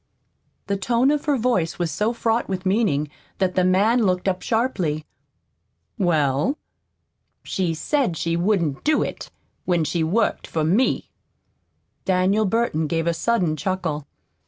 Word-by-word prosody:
The 200 - -1
tone 240 +6 +2
of 295 -1 -1
her 290 -2 +2
voice 225 -9 0
was 175 -3 -1
so 210 +9 0
fraught 230 0 0
with 190 -1 -3
meaning 185 -8 +1 0.3
that 185 -1 0
the 185 - +2
man 205 +6 +3
looked 185 -1 0
up 185 -1 0
sharply. 185 - -1 0.9
"Well?" 155 - +1 0.9
"She 175 -4 -1
said 240 - 0
she 165 +2 -1
wouldn't 170 -6 0
do 305 0 +3
it - - -6 0.4
when 175 -3 +2
she 165 +1 -1
worked 205 +8 0
for 160 - -1
me." 195 +12 +1 0.9
Daniel 190 +3 +2
Burton 195 -7 0
gave 165 0 -1
a 170 - +2
sudden 175 -2 +1
chuckle. 160 -5 -3
185 Hz, 140 wpm, -23 LUFS, 165-225 Hz, 0.9 s, man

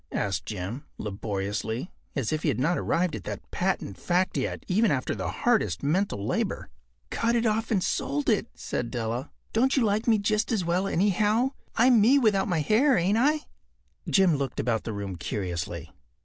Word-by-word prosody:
” - - -42
asked 90 -5 -2
Jim, 105 +7 -5
laboriously, 105 - -3 0.2
as 135 -1 -1
if 155 - -1
he - - -1
had 130 - -1
not 165 +7 +2
arrived 175 -1 0
at 105 - -7
that - - -7
patent 100 - -2
fact 180 +1 +1
yet - - -2
even 210 +4 +3
after 130 -5 0
the - - -3
hardest 85 - +1
mental 150 - 0
labor. - - -2 0.4
“Cut 235 +1 +1
it 235 0 +1
off 220 +1 +1
and 195 -5 +1
sold 145 +1 -1
it,” - - +2
said 120 - -3
Della. 120 +3 -3 0.2
“Don’t 260 +5 +2
you 260 - +4
like 210 +2 0
me 225 -2 +5
just 215 +2 0
as 205 -6 0
well, 180 +3 +1
anyhow? 210 +7 +2 0.2
I’m 240 -1 +5
me 250 +7 +6
without 210 -7 +3
my 175 -5 +1
hair, 240 - +4
ain’t 185 +5 +2
I?” 300 +4 +3 0.7
Jim 185 -6 +4
looked 135 -2 -3
about 115 -2 0
the 110 - -3
room 100 -3 -5
curiously. 85 -1 -4
175 Hz, 185 wpm, -27 LUFS, -, 0.7 s, me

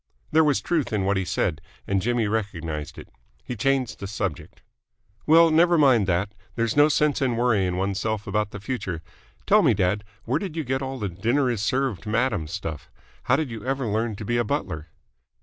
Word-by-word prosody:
There 160 - +5
was 150 -2 +2
truth 165 -6 -1
in 105 -3 0
what 100 +1 +2
he 95 -1 -1
said, 80 -3 -1 0.2
and 100 -1 0
Jimmy 120 +2 +1
recognised 85 -8 -3
it. - - -10 0.3
He 125 - -5
changed 130 0 0
the 100 - -5
subject. 100 -5 -5 0.6
"Well, 165 +1 +7
never 170 +2 +5
mind 130 -9 +4
that. 95 +3 0 0.2
There's 115 -1 0
no 145 +1 +6
sense 150 -1 +2
in 125 -4 +1
worrying 100 -7 +1
oneself 100 +2 -1
about 105 +1 -1
the 105 - -8
future. 95 -7 -4 0.4
Tell - - +5
me, - - +4
dad, 100 +1 +1 0.2
where - - 0
did 185 -6 -5
you 160 - -2
get 130 0 -1
all 135 0 -4
the 105 -4 -2
'dinner 120 +9 +1
is 115 -4 -2
served, 125 -5 -1
madam' 105 -7 0
stuff? 80 -3 -6 0.4
How - - +4
did 155 -6 -2
you 110 -2 -7
ever 135 +1 -1
learn 110 +1 -1
to 105 - -7
be 120 +3 0
a 120 - +2
butler?" 105 - -3
110 Hz, 200 wpm, -24 LUFS, 95-135 Hz, 0.6 s, Well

